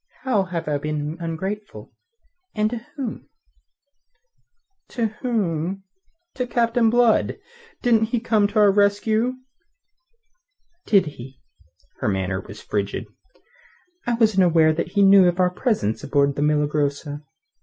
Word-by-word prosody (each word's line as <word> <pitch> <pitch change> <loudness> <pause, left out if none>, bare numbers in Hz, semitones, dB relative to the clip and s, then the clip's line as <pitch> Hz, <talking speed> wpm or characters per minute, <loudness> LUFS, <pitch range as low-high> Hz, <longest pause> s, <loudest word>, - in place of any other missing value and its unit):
"How 215 -7 +1
have 175 -4 -5
I 145 -1 0
been 150 +1 -3
ungrateful 190 +6 -6 0.6
and 215 0 +1
to 240 - -3 0.2
whom?" 260 -7 -6 1.6
"To 235 -3 -2 0.2
whom? 195 -6 -2 0.5
To 250 -1 -3
Captain 235 -1 +2
Blood. 235 -1 +2 0.5
Didn't 225 -2 +3
he 235 +2 -1
come 220 -3 +2
to 215 - -5
our 205 -1 +6
rescue?" 210 +4 +2 1.5
"Did 200 -3 +4
he?" 135 -3 -10 0.6
Her - - -2
manner 95 -1 -1
was 105 +3 -12
frigid. 100 -1 -3 1.0
"I 240 - +1
wasn't 215 -5 +3
aware 160 -2 +4
that 170 +2 -4
he 200 -1 +3
knew 195 -1 +7
of 175 +1 0
our 180 -1 +3
presence 180 - -1
aboard 140 -1 +1
the 145 - -3
Milagrosa." 150 0 0
190 Hz, 125 wpm, -22 LUFS, 150-220 Hz, 1.6 s, knew